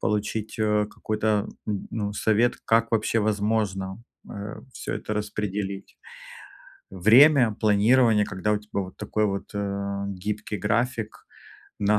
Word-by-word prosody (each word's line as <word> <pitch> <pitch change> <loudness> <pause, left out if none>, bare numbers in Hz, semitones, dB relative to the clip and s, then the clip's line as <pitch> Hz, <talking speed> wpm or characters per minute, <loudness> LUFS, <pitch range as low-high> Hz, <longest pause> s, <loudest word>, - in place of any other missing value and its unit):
получить, 105 +1 -2
э, 105 -1 +2
какой-то, 105 0 -1 0.2
м, 105 -2 -3
ну, 105 -2 -3
совет, 110 +3 +2
как 115 +1 +2
вообще 115 +1 +1
возможно, 105 -2 -1 0.3
э, 100 +1 -7
всё - - -5
это 105 - -5
распределить. 105 -2 -4 0.9
Время, 115 - +6
планирование, 110 +1 +4
когда 95 +3 -1
у 105 - +1
тебя 105 -1 -4
вот 95 0 -10
такой 105 +1 -1
вот, 100 -1 -4
э, 100 0 -3 0.2
гибкий 105 0 -3
график 115 +3 -1 0.5
на 105 +1 +3
105 Hz, 125 wpm, -25 LUFS, 100-110 Hz, 0.9 s, Время